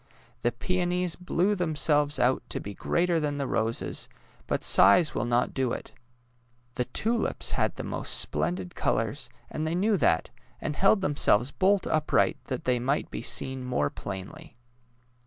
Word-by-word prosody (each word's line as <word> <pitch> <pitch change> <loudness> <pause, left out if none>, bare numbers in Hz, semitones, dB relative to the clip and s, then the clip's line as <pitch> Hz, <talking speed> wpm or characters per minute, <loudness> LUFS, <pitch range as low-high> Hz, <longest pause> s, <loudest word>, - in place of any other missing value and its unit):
The 120 - +1
peonies 180 +5 -1
blew 180 +2 0
themselves 150 -5 +2
out 130 +1 +2
to - - -3
be 100 - -7
greater 170 - 0
than 145 -2 -2
the 140 - -2
roses, 115 -2 -2 0.4
but - - -2
size 100 - +6
will 110 - -1
not 120 0 0
do 130 -2 -1
it. - - -7 0.8
The 125 - -2
tulips 225 - -1
had - - 0
the - - -6
most - - +1
splendid 90 +5 -1
colours, - - -1 0.2
and 155 +1 -3
they 165 - -1
knew 205 +3 +2
that, 80 - +1 0.3
and 150 - -4
held 195 +3 +3
themselves 140 - +2
bolt 195 0 +2
upright 155 -1 +1
that 130 -2 -4
they 125 -1 +1
might 135 +4 -1
be - - -5
seen 130 +3 0
more 125 -13 -1
plainly. 115 - -8
145 Hz, 155 wpm, -27 LUFS, 120-175 Hz, 0.8 s, size